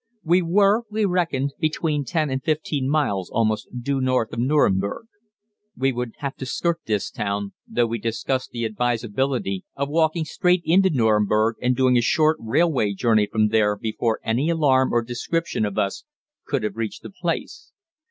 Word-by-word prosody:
We 175 Hz, +3 st, +3 dB
were, 200 Hz, +5 st, +3 dB
we 215 Hz, 0 st, 0 dB
reckoned, 165 Hz, -7 st, 0 dB
between 155 Hz, -2 st, -1 dB
10 155 Hz, -3 st, -1 dB
and 130 Hz, 0 st, -2 dB
15 150 Hz, -3 st, -1 dB
miles 120 Hz, -, 0 dB
almost 110 Hz, -2 st, 0 dB, 0.2 s
due 140 Hz, +1 st, 0 dB
north 130 Hz, -3 st, 0 dB
of 115 Hz, -, -4 dB
Nüremberg. 120 Hz, -, +1 dB, 0.7 s
We 135 Hz, +1 st, +2 dB
would 125 Hz, -2 st, -4 dB
have 140 Hz, -2 st, -4 dB
to 130 Hz, -, -5 dB
skirt 170 Hz, +5 st, -1 dB
this 105 Hz, -3 st, -1 dB
town 100 Hz, -1 st, -3 dB
though 120 Hz, -, +1 dB
we 115 Hz, 0 st, -3 dB
discussed 115 Hz, +4 st, -2 dB
the 120 Hz, -1 st, -3 dB
advisability 115 Hz, -2 st, -1 dB
of 140 Hz, 0 st, -2 dB
walking 160 Hz, +1 st, +1 dB
straight 180 Hz, +3 st, +1 dB
into 190 Hz, +3 st, +4 dB
Nüremberg 110 Hz, -, +2 dB
and 125 Hz, 0 st, +2 dB
doing 130 Hz, -1 st, +3 dB
a -, -, +4 dB
short 155 Hz, +5 st, +3 dB
railway 115 Hz, -2 st, +1 dB
journey 110 Hz, 0 st, +2 dB
from 110 Hz, -1 st, +2 dB
there 105 Hz, -1 st, +2 dB
before 110 Hz, +2 st, -2 dB
any 125 Hz, +8 st, 0 dB
alarm 140 Hz, -6 st, +3 dB
or 120 Hz, 0 st, +2 dB
description 120 Hz, +3 st, -2 dB
of 105 Hz, -1 st, -4 dB
us 100 Hz, -2 st, -1 dB, 0.4 s
could 125 Hz, -, -1 dB
have 105 Hz, -, -3 dB
reached 110 Hz, -2 st, -4 dB
the -, -, -9 dB
place. 180 Hz, -, -4 dB
130 Hz, 170 wpm, -23 LUFS, 110-155 Hz, 0.7 s, into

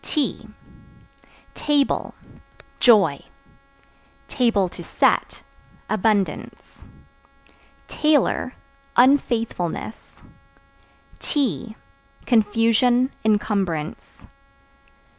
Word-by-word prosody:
T 300 Hz, -3 st, -2 dB, 1.1 s
Table 290 Hz, -2 st, 0 dB, 0.6 s
Joy; 220 Hz, -5 st, +4 dB, 1.1 s
(to 225 Hz, -9 st, 0 dB
set) -, -, 0 dB, 0.5 s
abundance. 210 Hz, -1 st, -2 dB, 1.0 s
Tailor 295 Hz, -4 st, +1 dB, 0.4 s
Unfaithfulness. 230 Hz, -, 0 dB, 1.0 s
Tea 230 Hz, -, -2 dB, 0.5 s
Confusion, 230 Hz, +3 st, +2 dB
incumbrance. 205 Hz, -7 st, -1 dB
225 Hz, 45 wpm, -22 LUFS, 205-255 Hz, 1.1 s, Joy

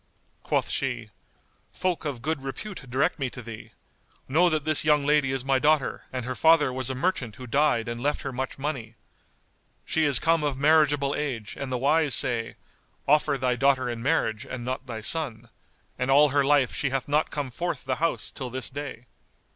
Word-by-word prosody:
Quoth -, -, -1 dB
she, -, -, -2 dB, 0.6 s
"Folk 180 Hz, -4 st, -2 dB
of 135 Hz, -6 st, -4 dB
good 155 Hz, -1 st, -1 dB
repute 135 Hz, +2 st, -7 dB
direct 135 Hz, +7 st, 0 dB
me 135 Hz, -2 st, -1 dB
to 125 Hz, -, -10 dB
thee. 115 Hz, -2 st, -9 dB, 0.6 s
Know 170 Hz, +6 st, +4 dB
that 155 Hz, -3 st, -1 dB
this 155 Hz, -1 st, +6 dB
young 150 Hz, -2 st, +3 dB
lady 145 Hz, -2 st, +3 dB
is 135 Hz, -1 st, -2 dB
my 135 Hz, -1 st, +2 dB
daughter 150 Hz, -1 st, +1 dB
and 130 Hz, -2 st, -4 dB
her 130 Hz, -, -3 dB
father 150 Hz, -2 st, +4 dB
was 130 Hz, -1 st, -1 dB
a 130 Hz, -, -2 dB
merchant 130 Hz, -, -1 dB
who 130 Hz, -, -9 dB
died 140 Hz, -2 st, +1 dB
and 120 Hz, 0 st, -4 dB
left 145 Hz, +3 st, -1 dB
her 135 Hz, -, -4 dB
much 130 Hz, +1 st, -4 dB
money. 135 Hz, -6 st, -4 dB, 0.9 s
She 160 Hz, -, +1 dB
is 140 Hz, -4 st, +4 dB
come 165 Hz, +2 st, +2 dB
of 145 Hz, -3 st, -1 dB
marriageable 145 Hz, -1 st, +3 dB
age 125 Hz, -8 st, -4 dB
and 140 Hz, -2 st, -5 dB
the 125 Hz, -, 0 dB
wise 145 Hz, +2 st, +3 dB
say, 115 Hz, -2 st, +1 dB, 0.5 s
'Offer 150 Hz, 0 st, +3 dB
thy 125 Hz, -1 st, 0 dB
daughter 135 Hz, 0 st, +2 dB
in 115 Hz, -1 st, -6 dB
marriage 115 Hz, -6 st, 0 dB
and 120 Hz, -2 st, -7 dB
not 130 Hz, +1 st, -4 dB
thy 110 Hz, -2 st, -5 dB
son'; 135 Hz, -2 st, -3 dB, 0.5 s
and 125 Hz, +1 st, -1 dB
all 145 Hz, +2 st, +6 dB
her 140 Hz, +1 st, +2 dB
life 140 Hz, -2 st, +3 dB
she 135 Hz, -, -1 dB
hath 135 Hz, -1 st, -2 dB
not 150 Hz, +2 st, +1 dB
come 145 Hz, -3 st, -4 dB
forth 170 Hz, 0 st, -4 dB
the 130 Hz, -1 st, -1 dB
house 165 Hz, +2 st, -1 dB
till 130 Hz, -3 st, -6 dB
this 130 Hz, +2 st, -4 dB
day. 135 Hz, -4 st, -7 dB
135 Hz, 195 wpm, -26 LUFS, 125-150 Hz, 0.9 s, this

